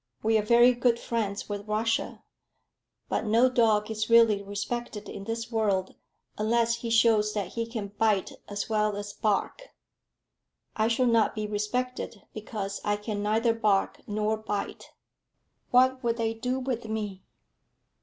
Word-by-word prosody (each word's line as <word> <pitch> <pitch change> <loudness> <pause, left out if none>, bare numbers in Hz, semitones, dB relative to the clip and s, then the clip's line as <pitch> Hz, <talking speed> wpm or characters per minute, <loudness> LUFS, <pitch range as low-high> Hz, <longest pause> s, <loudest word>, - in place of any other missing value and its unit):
We 225 +1 +2
are - - +2
very 240 +3 +5
good 240 -1 +2
friends 215 -3 -3
with 205 0 -5
Russia; 225 +2 -1 0.8
but - - -1
no 230 +3 +4
dog 220 -3 +2
is 215 +1 -2
really 230 -3 +5
respected 210 +2 -5
in 195 - -8
this 230 +1 -4
world 200 -4 0 0.5
unless 230 +2 +2
he 235 - -5
shows 225 -2 +3
that 200 -4 -2
he 230 +2 -3
can 220 -4 -5
bite 210 -1 +1 0.2
as 205 0 -3
well 215 -1 +1
as 205 0 -6
bark." 210 - -1 1.1
"I 220 0 +2
shall 235 +2 +2
not 230 -2 +3
be 215 -1 -2
respected, 215 +1 -3
because 205 -2 -5
I 205 0 +1
can 210 0 -4
neither 220 +3 +2
bark 210 -4 +1
nor 215 +1 0
bite. 215 -2 -5 0.8
What 255 +1 +4
will 230 -1 +1
they 225 -1 -1
do 250 +3 -2
with 250 -3 -3
me?" 210 -3 -4
220 Hz, 150 wpm, -27 LUFS, 210-230 Hz, 1.1 s, very